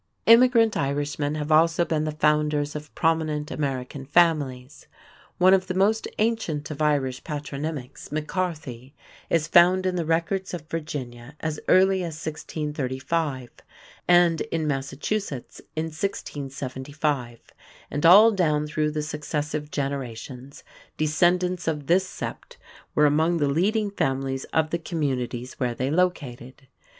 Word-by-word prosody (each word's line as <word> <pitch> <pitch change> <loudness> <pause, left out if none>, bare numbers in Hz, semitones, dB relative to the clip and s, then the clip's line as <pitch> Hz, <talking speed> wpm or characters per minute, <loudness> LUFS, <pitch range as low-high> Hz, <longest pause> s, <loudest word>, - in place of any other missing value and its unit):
Immigrant 230 -1 +6
Irishmen 145 +1 -1
have 150 0 -3
also 165 +2 +4
been 155 -2 -1
the 155 - -1
founders 150 -1 +1
of 150 0 -8
prominent 160 -2 0
American 135 -1 -3
families. 140 -4 +1 0.5
One 185 +1 +6
of 190 -1 +2
the 185 - -3
most 210 +4 +2
ancient 195 -10 -1
of 150 0 -6
Irish 140 -4 0
patronymics, 145 -2 -6
McCarthy, 150 -5 -4 0.3
is 165 -2 +1
found 180 +2 +5
in 185 -1 0
the 170 - 0
records 170 +4 -1
of 160 -3 -9
Virginia 140 -5 -6
as 155 -1 -3
early 190 +1 +5
as 165 -3 -5
1635 150 -3 -3 0.6
and 175 -2 +5
in 165 -2 -2
Massachusetts 140 - -3
in 155 +1 -1
1675, 140 -5 -4 0.5
and 145 - -3
all 205 +7 +8
down 155 -7 +1
through 150 0 -1
the 150 0 -3
successive 150 0 -3
generations 135 -2 -5 0.3
descendants 175 +3 +1
of 150 -3 -1
this 185 +4 +3
sept - - -7 0.4
were 150 - +5
among 160 +4 +3
the 145 -3 +1
leading 200 +8 +1
families 135 -6 -1
of 160 -1 0
the 170 - -1
communities 130 -7 -3
where 125 -3 -1
they 130 +3 -1
located. 140 -7 -2
150 Hz, 130 wpm, -25 LUFS, 140-170 Hz, 0.6 s, all